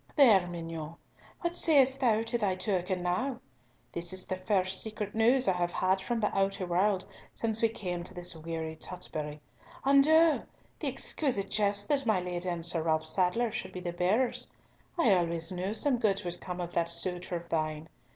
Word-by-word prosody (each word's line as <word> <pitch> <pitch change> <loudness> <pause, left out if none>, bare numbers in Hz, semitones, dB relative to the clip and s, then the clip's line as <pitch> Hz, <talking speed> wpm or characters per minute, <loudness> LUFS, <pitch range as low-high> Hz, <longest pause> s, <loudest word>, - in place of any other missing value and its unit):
"There, 215 - +6
mignonne! 165 -2 -6 0.5
What 345 0 -1
sayest 270 -6 +4
thou 225 -3 +3
to 230 +1 -2
thy 195 -4 +1
token 185 -1 -1
now? 235 +9 -1 0.5
This 170 0 -1
is 185 0 -1
the 185 - -2
first 185 -1 0
secret 215 -2 -4
news 240 +4 +3
I - - +5
have 175 -1 -1
had 190 +1 +1
from 235 +3 -2
the 210 - -1
outer 195 0 0
world 185 +2 +1 0.3
since 225 -1 0
we 230 - +4
came 180 -6 -4
to - - -7
this 175 -1 -4
weary 160 0 -5
Tutbury. 155 -4 -5 0.4
And 275 +1 +6
oh! 320 0 +5 0.4
the - - -3
exquisite 250 -10 -1
jest 205 -1 +2
that 275 -3 +1
my 215 -4 +3
Lady 180 0 -3
and 170 -2 -3
Sir 170 -1 +1
Ralf 160 -1 0
Sadler 185 +8 +1
should - - -5
be 185 - -5
the 175 -1 -4
bearers! 205 +9 +1 0.5
I 240 - +4
always 170 -1 0
knew 185 +3 -3
some 255 +2 +2
good 205 -3 +1
would 175 0 -1
come 180 -1 -6
of 175 -1 -5
that 170 0 0
suitor 175 +1 0
of 170 0 -6
thine! 155 -1 -2
185 Hz, 190 wpm, -30 LUFS, 175-225 Hz, 0.5 s, There